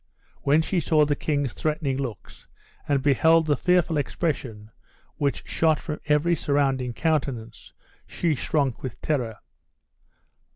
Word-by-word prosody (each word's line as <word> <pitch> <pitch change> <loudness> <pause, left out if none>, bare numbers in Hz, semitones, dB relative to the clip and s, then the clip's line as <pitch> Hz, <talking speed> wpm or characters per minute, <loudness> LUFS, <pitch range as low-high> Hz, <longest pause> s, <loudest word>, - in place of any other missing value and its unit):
When 150 +3 +3
she 180 +2 0
saw 155 -1 +3
the 145 0 0
king's 145 -3 -1
threatening 150 -3 -1
looks, 125 -8 -7 0.4
and 140 -2 +1
beheld 160 +4 +4
the 150 -2 +2
fearful 175 0 +2
expression 130 -8 -3 0.5
which 140 -1 -1
shot 160 -2 +2
from 150 - -6
every 150 +3 +3
surrounding 135 -5 0
countenance, 135 -6 -2 0.4
she 170 -3 0
shrunk 140 -3 -1
with 130 -3 -6
terror. 120 -8 -1
145 Hz, 125 wpm, -25 LUFS, 130-155 Hz, 0.5 s, beheld